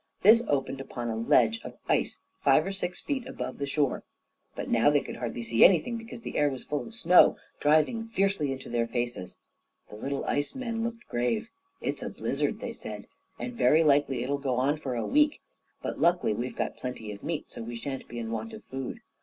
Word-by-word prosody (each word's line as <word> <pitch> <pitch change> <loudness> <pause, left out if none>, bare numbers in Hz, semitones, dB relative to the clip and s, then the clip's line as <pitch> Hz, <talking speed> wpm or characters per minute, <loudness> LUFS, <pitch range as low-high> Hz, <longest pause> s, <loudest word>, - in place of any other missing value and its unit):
This 225 +4 +8
opened 135 -1 0
upon 120 -3 -5
a - - -2
ledge 115 0 +3
of - - -9
ice, - - +1 0.2
five 145 +3 +5
or 195 - -2
six 180 -2 -3
feet 265 -4 -3
above - - -5
the 140 - -2
shore, 140 -1 0 0.5
but - - -4
now 115 +4 +4
they 145 -1 +3
could - - -7
hardly 120 -1 -4
see 115 0 +4
anything, 190 +6 +5
because 230 +1 -8
the - - -3
air 145 0 +4
was 130 -3 -6
full 145 -1 -3
of 230 - -11
snow, 180 -5 +6 0.2
driving 155 +10 +3
fiercely 195 -9 +1
into 135 0 -6
their 120 -1 0
faces. 120 -5 -3 0.5
The - - -8
little 135 +5 -3
ice 145 - -1
men 230 -3 -2
looked 235 0 -5
grave. 215 - -1 0.3
"It's - - -2
a - - -3
blizzard," - - -2
they - - -4
said, - - -7 0.3
"and 250 - -5
very 165 -8 +4
likely 140 -4 +3
it'll 140 +2 -1
go 135 -3 -1
on 135 +4 +2
for 135 -4 -4
a 115 - -1
week. 300 +2 +3 0.4
But - - -3
luckily 175 -9 +3
we've 120 +4 -4
got - - -2
plenty 125 -4 -5
of 100 -1 -9
meat, 160 -1 -4
so - - -6
that 115 - -7
we 120 - -5
shan't 135 +3 -5
be 120 - -8
in 115 -1 -4
want 115 0 -4
of - - -9
food." 135 -1 -6
140 Hz, 215 wpm, -28 LUFS, 120-190 Hz, 0.5 s, This